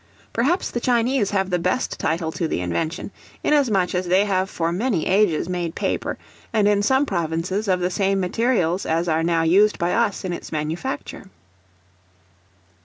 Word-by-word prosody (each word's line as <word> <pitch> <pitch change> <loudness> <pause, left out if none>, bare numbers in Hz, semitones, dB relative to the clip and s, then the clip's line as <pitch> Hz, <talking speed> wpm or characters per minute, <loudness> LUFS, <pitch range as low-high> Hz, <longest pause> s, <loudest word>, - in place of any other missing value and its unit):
Perhaps 285 +11 +1
the 240 - -2
Chinese 240 -2 +1
have 195 -1 -1
the 180 - +1
best 180 +9 -1
title 160 0 -1
to 165 - -2
the - - -2
invention, 90 - -3 0.3
inasmuch 230 -12 +2
as 180 0 -1
they 185 +3 +3
have 190 -1 0
for 165 -3 -1
many 190 -2 0
ages 185 -5 +2
made 175 -2 -3
paper, - - -2 0.3
and 215 -2 +2
in 205 -1 +3
some 265 +7 +3
provinces 175 - -2
of 185 -2 +2
the 180 +1 -1
same 195 +1 +1
materials 185 -2 +1
as 165 +2 0
are 160 0 +1
now 165 0 +1
used 200 +6 +4
by 175 +1 0
us 225 -4 0
in 180 - -2
its - - -7
manufacture. 160 - -4
185 Hz, 170 wpm, -22 LUFS, 170-210 Hz, 0.3 s, used